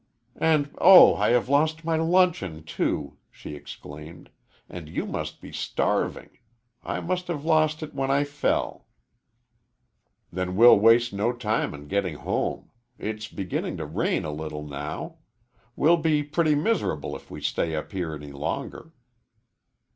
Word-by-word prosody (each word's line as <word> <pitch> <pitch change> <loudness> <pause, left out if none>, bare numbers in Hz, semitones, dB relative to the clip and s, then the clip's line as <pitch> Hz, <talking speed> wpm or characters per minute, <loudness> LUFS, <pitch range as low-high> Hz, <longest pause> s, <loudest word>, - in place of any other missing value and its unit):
"And 150 -3 +1
oh, 185 0 +9
I 105 +2 +1
have 120 0 +2
lost 155 +3 +1
my 165 -1 +1
luncheon, 160 - +1
too," 75 -2 -2
she - - -10
exclaimed, 75 +2 -11 0.4
"and 85 -4 -9
you - - -3
must - - -5
be - - -11
starving. - - -2 0.4
I - - -3
must 180 +1 -2
have 155 -4 -4
lost 155 -1 +2
it 155 - -8
when 135 -1 -2
I 140 +1 +3
fell." 145 0 -2 1.4
"Then 90 +1 -3
we'll 115 0 +8
waste 115 +1 +4
no 105 +4 0
time 110 -8 -1
in 75 0 -11
getting 95 -2 -1
home. - - -3 0.3
It's 105 0 -5
beginning 95 -3 -4
to - - -4
rain - - -1
a 75 - -3
little 75 0 -6
now. 75 - -6 0.6
We'll 165 +4 +4
be 155 -2 +1
pretty 155 +1 +1
miserable 150 - -1
if - - -12
we - - -8
stay 80 -1 -1
up 75 - -5
here 90 -5 -3
any 75 -1 -9
longer." 75 - -5
120 Hz, 145 wpm, -25 LUFS, -, 1.4 s, oh